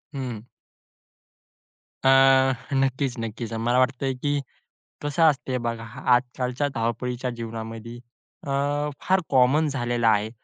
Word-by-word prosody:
हं. 125 -5 -4 1.6
अ, - - +3 0.7
नक्कीच 135 -1 0
नक्कीच, 115 0 -5
मला 120 +3 +1
वाटतंय, 130 +1 +1
की 145 +3 -1 0.6
कसं 145 +3 -1
असतं 135 -5 +2
बघा, 115 -1 -3 0.3
आजकालच्या 125 +2 -1
धावपळीच्या 120 +2 -2
जीवनामध्ये, 115 0 -7 0.5
अ, - - -3 0.5
फार 190 0 +2
कॉमन 135 +4 +4
झालेलं 120 -4 -1
आहे 110 -1 +3
125 Hz, 105 wpm, -25 LUFS, 115-135 Hz, 1.6 s, कॉमन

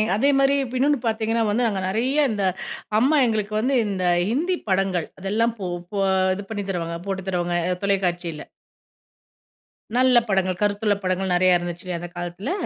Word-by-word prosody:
அதேமாரி 275 +3 +3 0.2
இன்னொன்னு 285 +2 +2
பார்த்தீங்கன்னா 225 +1 0
வந்து, 235 +4 +1
நாங்க 200 -4 -2
நறைய 260 +9 +1
இந்த 205 -2 -2 0.6
அம்மா 280 +6 +3
எங்களுக்கு 215 -2 -1
வந்து 260 +5 +1
இந்த 190 -2 -2 0.3
ஹிந்தி 340 +10 0
படங்கள் 190 -3 +1
அதெல்லாம் 225 +4 0
போ 190 - -3 0.3
போ 200 - 0 0.3
இது 200 - -6
பண்ணி 205 -2 -3
தருவாங்க, 170 -2 -3
போட்டு 190 -1 -3
தருவாங்க 175 -1 -1 0.3
தொலைக்காட்சியில. 175 -5 -1 1.5
நல்ல 255 -1 +5
படங்கள். 185 -2 +1
கருத்துள்ள 205 0 +1
படங்கள் 185 0 0
நறைய 180 0 +4
இருந்துச்சுல்ல 175 +1 -5
அந்த 175 +1 -7
காலத்துல. 175 - -4
200 Hz, 140 wpm, -23 LUFS, 185-230 Hz, 1.5 s, நல்ல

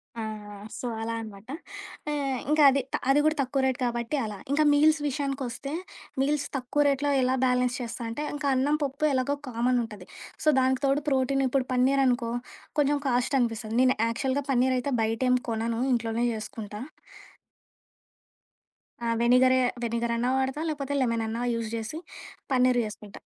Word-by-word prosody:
ఆ! 230 - -4 0.6
సో 250 - -3
అలా 230 +1 -2
అనమాట. 215 0 -10 0.6
ఆహ్, 275 -3 -1
ఇంకా 305 0 +5
అది 275 - +1
త - - +3
అది 275 - +5
కూడా 310 0 +3
తక్కువ 270 +1 0
రేటు 260 -1 0
కాబట్టి 235 +3 -2
అలా. 210 -2 -5
ఇంకా 300 +2 +3
మీల్స్ 305 +1 +5
విషయానికోస్తే, 275 -1 -3 0.5
మీల్స్ 290 +1 +1
తక్కువ 265 +3 -1
రేటులో 285 +1 +1
ఎలా 255 +1 +2
బ్యాలెన్స్ 250 0 +2
చేస్తా 240 +1 -5
అంటే, 290 +7 -4
ఇంకా 290 -1 -2
అన్నం, 285 +4 +2
పప్పు 280 +2 -1
ఎలాగో 265 +2 +1
కామనుంటది. 230 -5 -1 0.4
సో - - -3
దానికి 260 0 +2
తోడు 275 +2 +2
ప్రోటీన్ 270 0 +1
ఇప్పుడు 255 0 0
పన్నీరనుకో, 255 -2 +2 0.5
కొంచెం 290 0 +3
కాస్టనిపిస్తది. 240 -3 0
నేను 255 0 +4
యాక్చువల్‌గా 260 +4 -1
పన్నీరయితే 255 +1 +1
బయటేం 240 +3 +2
కొనను 230 +1 -1
ఇంట్లోనే 230 0 0
జేసుకుంటా. 215 -1 -6 2.3
ఆ! - - 0
వెనిగరే, 255 +2 +5 0.2
వెనిగరన్నా 235 +1 0
వాడతా, 265 +3 -1
లేకపోతే 285 -2 -3
లెమనన్నా 230 -2 -1
యూజ్ 230 -1 -3
చేసి, 230 +9 -5 0.5
పన్నీర్ 255 -1 +4
జేసుకుంటా. 210 -1 -9
255 Hz, 140 wpm, -27 LUFS, 230-275 Hz, 2.3 s, ఇంకా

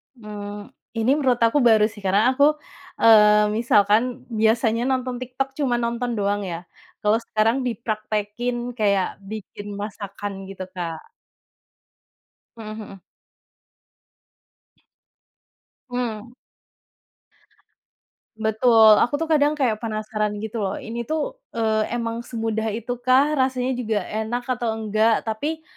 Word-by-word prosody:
Mmm, 205 -2 -8 0.3
ini 225 +2 +1
menurut 255 -4 +2
aku 230 +6 +4
baru 220 -2 +5
sih 205 -1 -13
karena 205 +7 +3
aku, 280 - +2 0.6
eee, 210 -1 +6
misalkan 210 -2 +4 0.4
biasanya 225 +1 +2
nonton 255 -1 -1
TikTok 255 +2 -3
cuma 260 -4 +1
nonton 235 +1 -2
doang 205 0 0
ya, 165 - -3 0.5
kalau 210 +2 +3
sekarang 220 +3 +1
dipraktekin 215 +1 -3 0.2
kayak 200 -4 +2 0.2
bikin 205 -1 -8
masakan 205 -1 -6 0.2
gitu, 190 -1 -7
Kak. 170 -3 -4 1.6
Hmm 215 -1 -7
hmm. 210 -2 -9 2.9
Hmm. 240 -2 -4 2.0
Betul 220 0 +5
aku 245 - +1
tuh, 325 - -2
kadang 295 0 +3
kayak 245 -7 0
penasaran 215 -1 -2
gitu 220 +1 -4
loh 195 -1 -1
ini 235 +1 -6
tuh, - - -2 0.2
eee, 220 -1 +1
emang 230 0 -3
semudah 225 -2 -3
itu 235 +2 -4
kah, 260 +4 +3
rasanya 260 -1 +1
juga 220 -4 -1
enak 220 +5 -3
atau 240 -2 -2
enggak, 220 0 +2
tapi 295 +9 -3
225 Hz, 115 wpm, -23 LUFS, 210-245 Hz, 2.9 s, eee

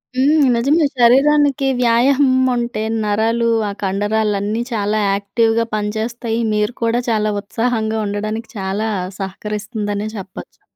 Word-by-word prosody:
హ్మ్. 285 +5 +3 0.2
నిజమే 285 +7 +2
శరీరానికి 275 +3 +4
వ్యాయామం 255 +3 +3 0.2
ఉంటే, 235 -2 -2 0.2
నరాలు 225 +3 +1 0.2
ఆ - - -2
కండరాలన్నీ 205 +2 0
చాలా 215 -1 0
యాక్టివ్‌గా 225 +3 +1
పనిచేస్తాయి. 225 +2 -3
మీరు 210 +2 0
కూడా 230 +1 +1
చాలా 215 -1 +1
ఉత్సాహంగా 220 +1 -1
ఉండడానికి 215 +3 -4
చాలా 200 +3 -2 0.3
సహకరిస్తుందనే 205 +1 -4
చెప్పొచ్చు. 190 -2 -10
220 Hz, 105 wpm, -18 LUFS, 210-240 Hz, 0.3 s, శరీరానికి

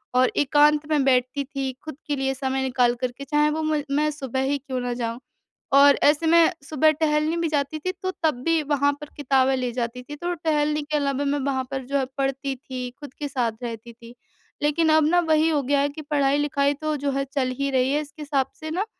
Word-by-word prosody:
और 255 0 +4
एकांत 295 +1 +4
में 295 -3 +2
बैठती 255 +1 +1
थी, 270 -1 -4
खुद 310 - -6
के 295 - 0
लिए 270 -1 -1
समय 265 0 -2
निकाल 250 -2 +2
कर 255 -1 -1
के, 275 +3 -10
चाहे 295 +2 +2
वो 315 +1 -2
म 310 -1 0
मैं 300 +2 +2
सुबह 265 -3 -3
ही 285 - +1
क्यों 265 -2 -5
ना 245 0 -2
जाऊँ? 235 -1 -3 0.5
और 280 0 +7
ऐसे 295 +3 +4
मैं 335 +1 +5 0.2
सुबह 310 +1 +4
टहलने 305 +1 0
भी 335 -1 0
जाती 295 +1 -1
थी, 370 +4 -2
तो 375 - 0
तब 310 -5 +3
भी 330 -1 +2
वहाँ 285 -1 +2
पर 295 - -7
किताबें 270 -1 +2
ले 250 -1 -2
जाती 240 +1 -4
थी, 295 +3 -8
तो 345 +4 -3
टहलने 300 -2 0
के 300 +1 -3
अलावा 280 0 -1
मैं 285 +1 0
वहाँ 265 -2 0
पर 265 -1 -3
जो 280 +2 -1
है 265 - 0
पढ़ती 270 0 -1
थी, 255 -1 -6
खुद 290 -3 -10
के 295 - -5
साथ 250 -4 -1
रहती 235 0 -6
थी। 235 +1 -14 0.5
लेकिन 315 +2 +2
अब 310 -1 +5
ना 350 +3 +4
वही 315 +1 +4
हो 295 -3 +1
गया 280 +2 +1
है 285 - +1
कि 300 +2 -8
पढ़ाई-लिखाई 285 -1 +1
तो 310 +1 -3
जो 280 0 -1
हैं 275 0 -1
चल 260 -3 0
ही 280 0 0
रही 260 0 +2
हैं, 295 - +1
इसके 305 +1 -11
हिसाब 280 -3 0
से 315 - -6
ना 375 +6 -1
285 Hz, 235 wpm, -24 LUFS, 265-300 Hz, 0.5 s, और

